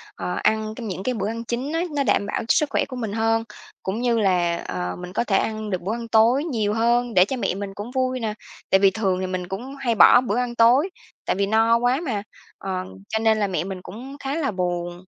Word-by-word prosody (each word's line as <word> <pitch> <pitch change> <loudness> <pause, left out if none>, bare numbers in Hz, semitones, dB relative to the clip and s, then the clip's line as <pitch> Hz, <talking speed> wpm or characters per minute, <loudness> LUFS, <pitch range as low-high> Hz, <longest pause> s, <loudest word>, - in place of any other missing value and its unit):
ờ, - - -3
ăn 215 0 +1
trong 230 -2 -6
những 190 0 -4
cái 255 - 0
bữa 215 -3 -2
ăn 230 +1 -4
chính 245 +5 -3
á, 330 - +1
nó 280 - +2
đảm 200 - +2
bảo 205 - -2
sức 300 - +3
khỏe - - +1
của 255 - -7
mình 225 -5 -4
hơn, 225 +1 +1 0.4
cũng 195 +4 -2
như 240 -2 +2
là, 175 -4 +2
ờ, 90 0 -3
mình 180 0 -8
có - - +1
thể 195 -5 +2
ăn 215 -1 -2
được 185 -3 -2
bữa 200 +5 -2
ăn 235 0 -5
tối 230 +5 +4
nhiều 220 -10 -1
hơn, 235 +2 +1
để 180 -2 +6
cho 260 +5 -3
mẹ 215 - -1
mình 200 0 -5
cũng 205 +5 -7
vui 255 -1 0
nè. 220 -3 -2 0.4
Tại 190 - +5
vì 195 0 +5
thường 190 -2 0
thì 185 - -2
mình 185 -1 -4
cũng 240 +9 -6
hay 255 -4 -1
bỏ 245 +3 +8
bữa 235 -2 -1
ăn 245 -1 -1
tối, 245 +10 +5 0.4
tại - - 0
vì 200 +1 +1
no 225 +3 +4
quá 245 +4 +1
mà, 210 -6 -2 0.3
ờ, 185 -1 -3 0.3
cho 220 - 0
nên 220 -1 +3
là 205 - +1
mẹ 180 -5 -1
mình 185 -1 -6
cũng 260 +9 -9
khá 275 +1 -3
là 305 -6 0
buồn. 175 -1 -3
220 Hz, 255 wpm, -23 LUFS, 195-245 Hz, 0.4 s, bỏ